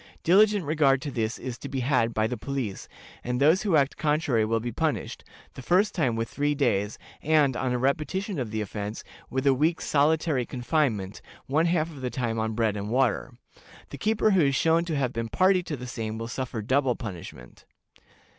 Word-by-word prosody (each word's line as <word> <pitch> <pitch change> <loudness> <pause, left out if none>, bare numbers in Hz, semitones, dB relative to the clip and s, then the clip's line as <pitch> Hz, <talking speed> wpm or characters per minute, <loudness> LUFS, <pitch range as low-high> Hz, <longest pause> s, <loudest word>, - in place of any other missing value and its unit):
Diligent 205 +1 +4
regard 145 -3 +3
to 145 - -4
this 115 -2 -2
is 125 -2 -6
to 140 - -7
be 135 -1 -2
had 120 -3 +2
by 110 -1 0
the 125 +3 -2
police, 125 -4 -4 0.4
and 125 0 -2
those 155 +7 +4
who 200 -6 +1
act 140 -2 +2
contrary 150 -7 +1
will 115 +1 +1
be 120 +2 -4
punished, - - -2 0.3
the - - -9
first 190 +9 +2
time 130 - 0
with 115 0 -2
three 145 +5 -1
days, 105 -7 0 0.2
and, 150 -4 +3
on 130 0 -1
a 125 - +1
repetition 155 - -1
of 120 -4 -3
the 110 0 -3
offense, 105 +1 -5 0.3
with 130 +2 -2
a 135 - +5
week's 160 +5 0
solitary 150 -2 +2
confinement, 120 - -1 0.2
one 155 +5 +2
half 165 -1 0
of 140 -4 -11
the 125 - -2
time 115 -3 -2
on 110 0 -2
bread 110 -2 +1
and 105 0 -4
water. 125 -1 0 0.6
The - - -8
keeper 215 0 +2
who 190 -3 +4
is 140 0 +1
shown 165 +3 +2
to 165 -3 -2
have 130 -3 -1
been 115 0 -3
party 185 - +3
to 155 -4 -5
the 125 - -7
same 110 -3 -4
will 115 0 -5
suffer 120 -2 -4
double 130 +1 +1
punishment. 85 - -9
130 Hz, 200 wpm, -26 LUFS, 115-155 Hz, 0.6 s, a